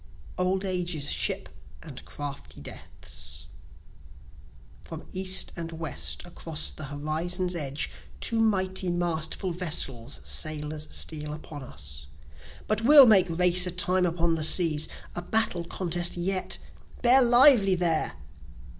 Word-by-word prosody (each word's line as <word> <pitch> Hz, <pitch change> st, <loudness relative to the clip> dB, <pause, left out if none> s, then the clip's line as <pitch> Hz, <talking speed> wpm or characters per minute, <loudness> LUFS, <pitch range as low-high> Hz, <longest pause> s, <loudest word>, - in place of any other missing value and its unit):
Old 185 Hz, +2 st, -1 dB
Age's 175 Hz, -6 st, -2 dB
Ship -, -, -1 dB, 0.3 s
& -, -, -10 dB
Crafty 145 Hz, -, -8 dB
Death's 70 Hz, -1 st, -6 dB, 1.4 s
From -, -, -10 dB
east 185 Hz, 0 st, +1 dB
and 165 Hz, -1 st, -6 dB
west 165 Hz, +1 st, -2 dB
across 165 Hz, -3 st, -3 dB
the 155 Hz, -, -7 dB
horizon's 160 Hz, +6 st, -2 dB
edge, 145 Hz, -3 st, -2 dB, 0.3 s
Two 230 Hz, -, +1 dB
mighty 190 Hz, -4 st, +1 dB
masterful 175 Hz, +1 st, -2 dB
vessels 145 Hz, -8 st, -1 dB
sailers 155 Hz, 0 st, -1 dB
steal 150 Hz, -1 st, -1 dB
upon 150 Hz, -1 st, -9 dB
us: 70 Hz, -, -8 dB, 0.6 s
But 215 Hz, 0 st, -1 dB
we'll 280 Hz, +3 st, +9 dB
make 195 Hz, -6 st, +5 dB
race 180 Hz, +2 st, +4 dB
a -, -, -2 dB
time 180 Hz, 0 st, +2 dB
upon 170 Hz, 0 st, 0 dB
the 160 Hz, -1 st, -2 dB
seas 155 Hz, -2 st, +3 dB, 0.3 s
a 175 Hz, -, -5 dB
battle 180 Hz, -3 st, -1 dB
contest 175 Hz, 0 st, -1 dB
yet! 185 Hz, +2 st, -2 dB, 0.5 s
bear 250 Hz, +2 st, +7 dB
lively 240 Hz, -5 st, +6 dB
there! 165 Hz, -, 0 dB
175 Hz, 120 wpm, -26 LUFS, 155-185 Hz, 1.4 s, we'll